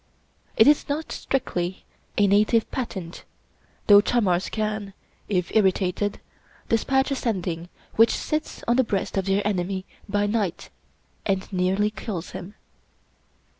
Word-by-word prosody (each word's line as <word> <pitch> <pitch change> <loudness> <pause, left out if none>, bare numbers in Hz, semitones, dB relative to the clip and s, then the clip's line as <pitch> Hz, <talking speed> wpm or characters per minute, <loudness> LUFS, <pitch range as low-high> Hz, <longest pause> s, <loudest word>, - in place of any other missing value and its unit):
It - - +7
is 295 0 +4
not 305 +2 -2
strictly 185 -8 -2 0.3
a 205 - +5
native 210 +3 +3
patent, 190 -9 -5 0.6
though 205 -2 +8
chamars 195 -6 +1
can, 215 -2 -3 0.4
if 180 -2 -1
irritated, 195 0 +1 0.5
dispatch 265 +4 +2
a - - +1
Sending 180 -8 -2 0.3
which 225 +1 +7
sits 305 0 -3
on 235 +1 +3
the 260 - +5
breast 200 -4 -2
of 195 -1 0
their 195 +1 +1
enemy 190 -1 -1 0.2
by 205 0 +1
night 205 -4 -2 0.5
and 195 -2 -1
nearly 190 +3 +1
kills 190 -5 -5
him. 195 +4 -8
205 Hz, 130 wpm, -25 LUFS, 185-225 Hz, 0.6 s, though